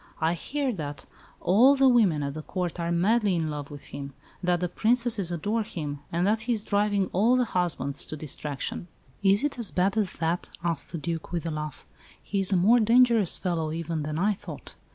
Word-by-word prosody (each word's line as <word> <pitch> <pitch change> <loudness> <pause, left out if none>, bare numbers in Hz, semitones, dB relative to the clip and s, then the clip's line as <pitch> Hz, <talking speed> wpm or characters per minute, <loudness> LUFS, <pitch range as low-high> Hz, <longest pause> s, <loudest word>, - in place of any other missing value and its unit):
I 160 +1 +2
hear 270 - -2
that 145 -6 -6 0.3
all 240 +10 +5
the 270 -1 +4
women 205 - +4
at 140 0 -3
the 155 - -6
Court 180 +1 -4
are 170 0 -1
madly 200 +3 +2
in 160 -2 -1
love 145 -1 -6
with 145 -1 -9
him; 140 -1 -6 0.3
that 180 -1 +1
the 180 - 0
Princesses 225 -1 +1
adore 205 +7 -1
him, 150 -8 -5
and 170 +2 +1
that 215 +2 +2
he - - +4
is 215 -2 -1
driving 205 -1 +1
all 225 +7 +4
the 250 -1 +2
husbands 170 -8 -1
to 155 - -6
distraction." 150 +2 -5 0.3
"Is 200 +2 +4
it 290 -4 -1
as 230 - 0
bad 190 +3 +1
as 205 -4 +1
that?" 165 +2 -2
asked 165 -4 -2
the 170 - -3
Duke, 165 0 -4
with 170 -2 -3
a 165 - -2
laugh. 150 -2 -6 0.3
"He 200 - -3
is 195 0 +2
a 190 - +4
more 220 +8 +5
dangerous 230 -3 +4
fellow 165 -4 -2
even 165 0 -3
than 150 +1 -3
I 205 +5 +2
thought. 200 - -10
180 Hz, 210 wpm, -27 LUFS, 160-215 Hz, 0.3 s, all